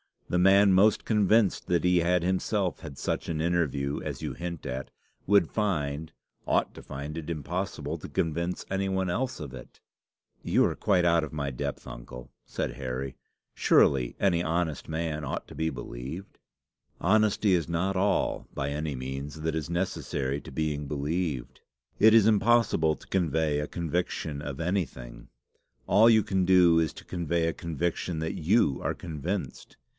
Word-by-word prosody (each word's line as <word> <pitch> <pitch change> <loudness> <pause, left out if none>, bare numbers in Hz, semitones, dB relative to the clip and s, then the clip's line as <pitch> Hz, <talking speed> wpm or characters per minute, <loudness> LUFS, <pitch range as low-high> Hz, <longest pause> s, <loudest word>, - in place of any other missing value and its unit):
The 90 - +1
man 100 +2 +6
most 100 +3 +4
convinced 105 -1 +2
that 85 -1 +1
he 90 0 +4
had 85 +1 +2
himself 95 +1 0
had 75 -5 -9
such - - -2
an 80 -2 -1
interview 75 -5 0
as - - -5
you - - -3
hint 85 -2 -6
at, 65 +1 -4 0.4
would 100 -4 +4
find 80 -7 -1 0.4
ought - - +1
to - - -11
find 70 +3 -6
it 80 0 -6
impossible 80 -1 -3
to - - -8
convince 85 +3 -2
any 95 0 0
one 95 -1 0
else 130 +7 -2
of 70 -3 -7
it." 65 -2 -11 0.6
"You - - +3
are - - 0
quite 95 -4 +2
out 85 -2 +3
of 75 - -11
my 70 -2 -2
depth, 60 - -4
uncle," - - -10
said - - -3
Harry. 65 0 -4 0.4
"Surely 65 -3 +3
any 90 -4 +2
honest 80 -2 -1
man 80 -1 -3
ought - - -4
to - - -10
be 80 0 -1
believed?" 65 +7 -7 0.6
"Honesty 105 +1 +3
is 85 -3 +1
not 95 +3 0
all, 100 +1 +1
by 70 +1 -2
any 75 0 -3
means, 70 +4 -6
that 80 0 -1
is 80 0 -3
necessary 75 -6 -2
to - - -11
being 75 0 -2
believed. 75 -1 -3 0.4
It 110 +1 +7
is 115 -3 +7
impossible 110 -7 +3
to - - -17
convey 80 -4 +1
a 75 - -2
conviction 80 -3 -3
of 75 0 -5
anything. 65 -10 -3 0.6
All 110 +4 +6
you 110 -2 +5
can 95 -1 0
do 90 -3 +6
is 80 -2 +1
to - - -12
convey 85 -1 -1
a 80 - 0
conviction 85 +1 -3
that 80 0 -3
you 80 - +3
are - - -1
convinced. 85 +4 -5
85 Hz, 165 wpm, -28 LUFS, 75-95 Hz, 0.6 s, It